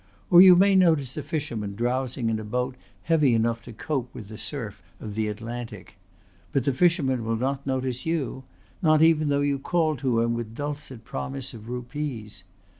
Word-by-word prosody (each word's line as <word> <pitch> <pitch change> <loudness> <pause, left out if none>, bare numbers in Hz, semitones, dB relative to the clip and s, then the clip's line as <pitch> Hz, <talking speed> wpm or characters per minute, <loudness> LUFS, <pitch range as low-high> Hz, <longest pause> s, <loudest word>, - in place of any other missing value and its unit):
Or 175 0 +10
you 185 -1 +10
may 195 +2 +5
notice 160 -9 +3
a 150 - -3
fisherman 135 -9 -4
drowsing 120 0 -1
in 110 - -1
a - - -6
boat 125 +4 -2 0.3
heavy 150 -7 +3
enough 115 +1 +1
to 120 - -9
cope 125 +2 -3
with 105 - -9
the 110 - -8
surf - - -5 0.2
of 105 - -7
the 110 +1 -1
Atlantic. 115 +3 -6 0.6
But 135 - +1
the 140 - +1
fisherman 135 - +2
will 115 0 -1
not 135 +4 -2
notice 130 -2 -1
you 145 -5 -2 0.4
not 155 -2 +5
even 155 -2 +4
though 140 0 +2
you 140 -1 0
call 160 +1 +1
to 125 -3 +1
him 115 0 +1
with 115 -1 -5
dulcet 145 -4 -6
promises 135 -1 -5
of 115 0 -10
rupees. 125 -5 -5
130 Hz, 185 wpm, -26 LUFS, 115-150 Hz, 0.6 s, Or